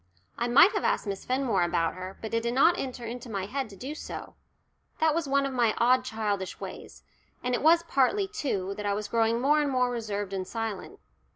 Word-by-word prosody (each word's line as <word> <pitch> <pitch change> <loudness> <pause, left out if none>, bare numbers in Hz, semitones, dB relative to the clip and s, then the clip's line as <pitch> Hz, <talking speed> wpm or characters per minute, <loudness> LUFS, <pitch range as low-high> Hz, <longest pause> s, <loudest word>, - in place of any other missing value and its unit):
I 240 - -1
might 280 +11 +7
have - - -2
asked - - +1
Miss 200 -2 -5
Fenmore 255 -7 +1
about 170 -1 +1
her, 185 +1 -8
but 220 - -5
it 230 - +2
did 235 +1 -2
not 330 +6 +5
enter 255 -6 -5
into 240 +1 -7
my 195 -3 -3
head 265 +3 -3
to 200 - -12
do 265 +9 -6
so: 310 - -8 0.7
that 315 -1 +3
was 330 -2 -1
one 275 0 +2
of 275 - -3
my 235 -4 +2
odd 250 +2 +4
childish 210 -6 -3
ways. - - -9 0.4
And 250 0 -1
it - - 0
was 335 +2 +5
partly, 340 +7 +2
too, 205 - -2
that 210 - -5
I 200 - +1
was 210 0 -3
growing 230 +1 +2
more 295 +4 +3
and 290 - 0
more 250 -2 +1
reserved 205 -4 -3
and 185 -1 -3
silent. 225 - -5
240 Hz, 220 wpm, -28 LUFS, 205-275 Hz, 0.7 s, might